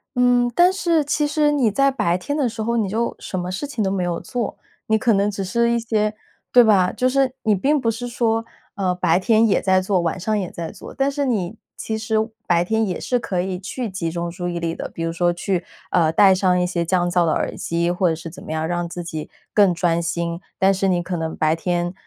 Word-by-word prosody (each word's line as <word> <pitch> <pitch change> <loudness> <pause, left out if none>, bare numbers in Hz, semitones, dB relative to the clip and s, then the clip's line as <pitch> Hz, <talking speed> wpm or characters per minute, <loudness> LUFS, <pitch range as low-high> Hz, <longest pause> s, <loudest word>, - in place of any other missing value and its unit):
嗯， 245 -1 +3
但 355 +1 +6
是 335 -5 +1
其 295 +1 +1
实 295 0 +2
你 275 -6 +2
在 275 +6 +2
白 210 -9 0
天 285 +11 -4
的 270 -5 +1
时 220 0 -5
候， 235 +1 0
你 210 -4 0
就 230 +4 -1
什 185 - -4
么 180 +1 -4
事 200 +10 -4
情 245 -6 -2
都 190 - 0
没 190 -2 -1
有 175 -1 -2
做， 240 -3 -4 0.3
你 220 - +3
可 230 +1 +2
能 200 +1 +2
只 200 -1 -4
是 235 +5 +1
一 235 - +2
些 215 -2 0 0.4
对 245 - +8
吧， 195 -5 +4
就 255 - 0
是 265 0 +2
你 215 - +3
并 280 +10 +2
不 230 -3 +1
是 235 +2 -5
说， 225 -1 0 0.3
呃， 185 -2 0
白 180 -1 +2
天 220 +3 +3
也 200 - +2
在 190 -1 +3
做， 185 0 +1
晚 170 +2 -2
上 215 +4 0
也 185 -3 -3
在 165 -1 -6
做， - - -11
但 275 +1 +1
是 285 0 -1
你 215 -5 -1 0.2
其 220 - -4
实 220 0 -2 0.3
白 175 -1 +3
天 220 +2 +1
也 180 - -3
是 250 - 0
可 185 -6 -2
以 185 0 -3
去 230 +6 -4
集 180 -3 -3
中 170 +1 -3
注 175 +1 -5
意 175 -1 -3
力 165 -1 -2
的。 - - -6
比 165 - -6
如 165 - -1
说 175 +1 +2
去， 175 +1 -2 0.3
呃， 165 -3 +3
戴 190 +3 +6
上 185 -1 +2
一 180 - +2
些 175 -1 -1
降 175 +1 +1
噪 175 -1 +3
的 160 - +2
耳 - - -2
机， 170 +1 -1
或 180 0 +1
者 160 - 0
是 165 +1 -9
怎 180 - -12
么 - - -7
样 160 0 -1
让 175 0 -2
自 175 +1 -6
己 160 -2 -6 0.2
更 200 -3 +5
专 170 0 +1
心， 170 0 -3 0.2
但 195 +1 +4
是 195 0 0
你 175 -2 +1
可 180 +1 -3
能 160 -1 -4
白 155 +1 +2
天， 175 +1 -1
190 Hz, 270 characters per minute, -21 LUFS, 175-235 Hz, 0.4 s, 对